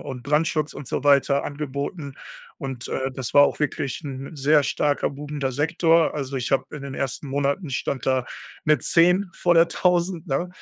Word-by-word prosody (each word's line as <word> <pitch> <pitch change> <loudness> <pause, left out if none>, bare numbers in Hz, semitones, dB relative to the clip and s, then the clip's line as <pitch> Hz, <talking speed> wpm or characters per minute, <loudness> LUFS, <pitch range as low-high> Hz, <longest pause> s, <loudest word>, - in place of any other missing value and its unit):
und 125 -3 -7
Brandschutz 150 +1 +1
und 135 - -9
so - - -3
weiter 140 0 +4
angeboten. 140 +1 -5 0.4
Und, 130 -3 -6
äh, 135 0 -2
das 130 -2 -5
war 145 - +8
auch - - -1
wirklich 145 -3 -2
'n 140 +2 -7
sehr 145 +1 +3
starker, 145 +1 0
boomender 145 -1 -4
Sektor. 165 +3 +2
Also, 140 -2 -4
ich 125 - -3
habe 135 -1 +2
in 150 - -7
den 140 -1 -6
ersten 135 +1 -4
Monaten 140 +4 -1
ich 130 - -2
stand 130 -5 -3
da 130 -2 +2 0.4
mit 150 0 +3
10 180 +3 +3
vor 175 -1 +2
der 165 0 +5
1000, 180 -1 0
ne? 170 +4 -1
145 Hz, 185 wpm, -23 LUFS, 135-160 Hz, 0.4 s, war